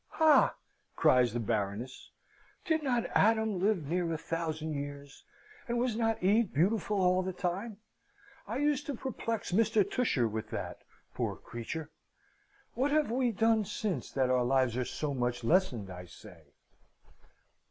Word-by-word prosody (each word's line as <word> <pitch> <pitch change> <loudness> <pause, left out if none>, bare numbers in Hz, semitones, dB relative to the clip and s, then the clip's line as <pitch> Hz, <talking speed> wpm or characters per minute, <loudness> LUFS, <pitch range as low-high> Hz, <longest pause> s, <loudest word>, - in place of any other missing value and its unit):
"Ha!" 315 -2 +5 0.4
cries 125 -2 +4
the 120 - -2
Baroness. 110 +2 -3 0.6
"Did 320 -3 +1
not 245 -5 0
Adam 220 -2 +3
live 190 -4 +1
near 170 +1 0
a 160 - -1
thousand 160 -1 -3
years, 140 -1 -7 0.4
and 240 0 -1
was 240 -2 0
not 225 -3 0
Eve 210 +2 +3
beautiful 205 +6 +1
all 185 0 +3
the 185 0 -3
time? 190 +4 -3 0.7
I - - -3
used 290 0 0
to 285 - -2
perplex 230 -5 -4
Mr. 210 +1 +3
Tusher 140 - +1
with 110 0 -5
that - - -5 0.3
poor - - -2
creature! 145 +7 -7 0.8
What 270 +3 +1
have 300 -4 +2
we 250 0 +1
done 225 +1 +2
since, 205 -1 -3
that 130 -2 +1
our 125 -1 +3
lives 130 -1 +2
are 125 0 -1
so 150 +2 -3
much 120 -2 -1
lessened, 120 - +1
I 90 0 -8
say?" 90 - -15
180 Hz, 150 wpm, -31 LUFS, -, 0.8 s, Ha